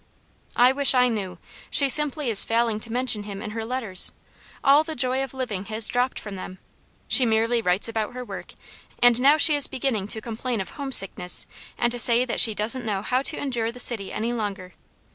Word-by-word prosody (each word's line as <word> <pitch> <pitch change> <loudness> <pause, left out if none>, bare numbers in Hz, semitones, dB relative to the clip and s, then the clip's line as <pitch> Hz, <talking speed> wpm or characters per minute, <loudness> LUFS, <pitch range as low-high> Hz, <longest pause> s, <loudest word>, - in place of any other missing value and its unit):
"I 245 +1 +4
wish 275 0 +1
I 250 0 +3
knew! 195 -6 -5 0.3
She 280 - +2
simply 295 -1 +1
is 205 - +6
failing 230 -1 -1
to 225 +1 -8
mention 245 -3 0
him 205 -1 -9
in 210 - -8
her 225 +1 -6
letters; 225 -6 0 0.5
all 285 +3 +4
the 315 -1 -7
joy 255 +1 -1
of 270 - -8
living 215 -7 -5
has 215 +1 0
dropped 250 +1 -2
from 205 -2 -9
them, 185 0 -10 0.5
she 265 - +6
merely 230 +1 0
writes 180 +1 +1
about 220 -1 -4
her 250 0 -7
work; - - -10 0.4
and 245 0 +3
now 285 +3 +4
she 310 0 +5
is 285 - +1
beginning 250 -7 -4
to 220 +1 -3
complain 230 +1 -5
of 190 - -6
homesickness 195 -10 +3 0.3
and 240 0 -1
to 245 - -3
say 240 +1 +6
that 240 - -3
she 220 -2 +6
doesn't 230 +5 -1
know 205 -3 -4
how 255 +4 -1
to 300 - -5
endure 240 -5 -4
the 250 - -13
city 225 -5 0
any 230 +3 -4
longer. 200 -5 -6
235 Hz, 205 wpm, -22 LUFS, 215-255 Hz, 0.5 s, is